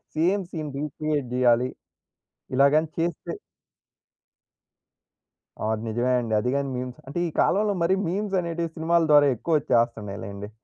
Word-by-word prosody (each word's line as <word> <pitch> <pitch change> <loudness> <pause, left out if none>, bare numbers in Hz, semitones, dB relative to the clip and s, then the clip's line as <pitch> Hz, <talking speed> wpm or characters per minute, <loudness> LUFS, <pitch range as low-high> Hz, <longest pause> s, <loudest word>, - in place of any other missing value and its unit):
Same 185 +5 +2
scene 155 -3 -4
recreate 150 -1 -2
జేయాలి. 125 0 +3 0.9
ఇలాగని 145 +4 +4
చేస్తే 170 -1 -2 2.3
ఆ! - - 0
అది 110 0 -4
నిజమే 120 +3 0
అండి. 115 -2 -3
అది 125 - -1
గాని 140 -1 -1
మీమ్స్ 125 0 -6
అంటే, 145 +6 -3
ఈ - - -3
కాలంలో 205 +2 +2
మరి 180 +3 +3
మీమ్స్ 195 +3 -1
అనేటివి 170 -1 -3
సినిమాల 165 +1 +2
ద్వారా 145 -1 +7
ఎక్కువ 160 +7 +1
వచ్చేస్తున్నాయిలెండి. 105 -5 -1
145 Hz, 130 wpm, -25 LUFS, 120-170 Hz, 2.3 s, ద్వారా